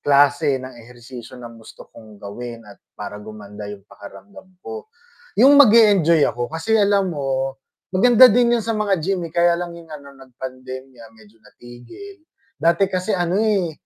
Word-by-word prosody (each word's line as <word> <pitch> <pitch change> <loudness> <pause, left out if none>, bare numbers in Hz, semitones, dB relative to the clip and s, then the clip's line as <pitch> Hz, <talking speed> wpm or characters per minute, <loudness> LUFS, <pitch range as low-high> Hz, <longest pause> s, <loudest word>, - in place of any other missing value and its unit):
klase 145 0 +2
ng 130 0 -8
ehersisyo 120 +1 -13
na 120 -1 -10
gusto 115 -1 -15
kong 110 -2 -15
gawin 115 +3 -9
at - - -16 0.2
para 105 0 -8
gumanda 105 -1 -10
yung 100 -1 -10
pakiramdam 185 - -15 0.2
ko, 440 0 -8 0.5
yung 280 +6 +6
mag-e-enjoy 205 - +5
ako 120 0 -3
kasi 160 +7 -4
alam 200 -3 +1
mo 135 -2 -3 0.3
maganda 245 +6 +6
din 240 +2 +2
yun 225 - -5
sa 230 - -2
mga 205 -3 0
gym, 180 +1 -2
eh, - - -26
kaya 170 0 +2
lang 175 0 -6
yung 170 -1 -14
ano, 140 -2 -11
nag-pandemya 130 -2 -11
medyo 110 0 -21
natigil. 120 - -14 0.4
Dati 170 +3 +2
kasi 185 +3 -2
ano, 175 0 -1
eh, 200 -6 0
145 Hz, 160 wpm, -20 LUFS, 120-195 Hz, 0.5 s, yung